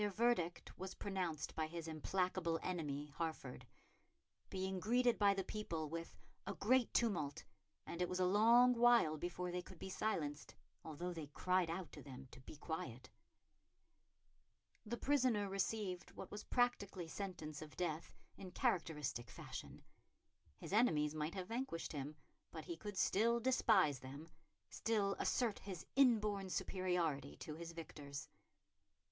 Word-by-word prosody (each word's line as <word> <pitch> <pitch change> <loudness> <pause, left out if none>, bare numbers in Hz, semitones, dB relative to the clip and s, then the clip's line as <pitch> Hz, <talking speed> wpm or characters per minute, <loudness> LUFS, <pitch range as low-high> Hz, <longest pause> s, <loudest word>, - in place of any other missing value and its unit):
Their 210 - +2
verdict 205 -5 +1
was 190 +1 -5
pronounced 180 -6 -2
by 160 -1 -1
his 165 0 -5
implacable 170 +1 0
enemy, 150 -5 -3
Hertford; 160 -6 -3 0.8
being 190 0 -2
greeted 240 +4 +3
by 200 -1 +5
the 195 - 0
people 170 -7 -3
with 165 0 -5 0.3
"a - - -2
great 250 +3 +3
tumult, 170 -12 +1 0.4
and 170 - -5
it 180 - +1
was 180 - -1
a 185 - +4
long 230 +6 +7
while 235 -9 +6
before 175 +2 -3
they 180 0 -1
could 185 - -12
be 190 - -6
silenced, 155 -9 -2 0.3
although 170 +3 -4
they 160 -3 -5
cried 180 +4 +1
out 170 0 -3
to - - -9
them 135 -1 -9
to - - -11
be 130 - -10
quiet." 130 -5 -5 1.8
The 240 +3 -2
prisoner 250 -8 +3
received 195 -1 -1
what - - -8
was 210 +1 -6
practically 200 -8 +1
sentence 160 -5 -5
of 155 -1 -9
death 165 -3 -2 0.2
in 190 - -7
characteristic 150 -8 0
fashion. - - -8 0.7
His - - -7
enemies 155 -10 +4
might 155 +2 -2
have 185 -2 -3
vanquished 230 -8 -2
him, 145 +1 -4 0.3
but - - -7
he 345 - -4
could 205 -8 -6
still 230 +6 +3
despise 220 - +4
them, 140 +5 -8 0.4
still 205 - +1
assert 235 -5 +1
his 190 -5 -6
inborn 210 -7 +4
superiority 175 -8 0
to 155 - -5
his 165 +2 -6
victors. 145 -4 -7
180 Hz, 145 wpm, -40 LUFS, 155-210 Hz, 1.8 s, long